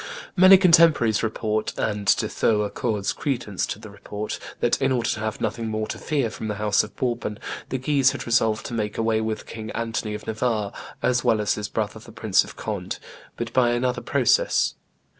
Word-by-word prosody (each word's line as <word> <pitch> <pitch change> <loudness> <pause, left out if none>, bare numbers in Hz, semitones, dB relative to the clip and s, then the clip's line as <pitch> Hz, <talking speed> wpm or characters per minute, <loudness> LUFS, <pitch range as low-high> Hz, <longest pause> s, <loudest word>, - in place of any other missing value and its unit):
Many 185 +1 +9
contemporaries 165 - +5
report, 110 -1 -2
and 105 -2 -2
De - - -1
Thou 105 -2 +1
accords 105 -2 -1
credence 115 -6 -2
to - - -4
the 110 -1 -11
report, 105 +1 -6 0.2
that, 120 - +1
in 135 0 +2
order 120 -2 +1
to - - -3
have 110 0 -3
nothing 115 -1 -2
more 110 0 -2
to - - -5
fear 140 -8 -1
from 110 - -6
the 105 - -2
house 105 0 +2
of 105 - -10
Bourbon, 120 -4 -2 0.3
the 130 - -1
Guises 135 0 +3
had - - -6
resolved 115 -2 +2
to - - -5
make 105 -2 -2
away 110 -1 +1
with 110 0 -3
King 110 -1 -7
Anthony 115 -2 -2
of - - -8
Navarre 110 -2 -1 0.3
as 125 -1 +2
well 110 - +3
as 105 -2 +1
his 105 0 -4
brother 110 0 -3
the 115 +1 -13
Prince 110 -4 +2
of - - -11
Conde, - - -4 0.4
but 115 -1 -4
by 120 -2 +4
another 125 +1 0
process. - - +2
110 Hz, 195 wpm, -24 LUFS, 105-125 Hz, 0.4 s, Many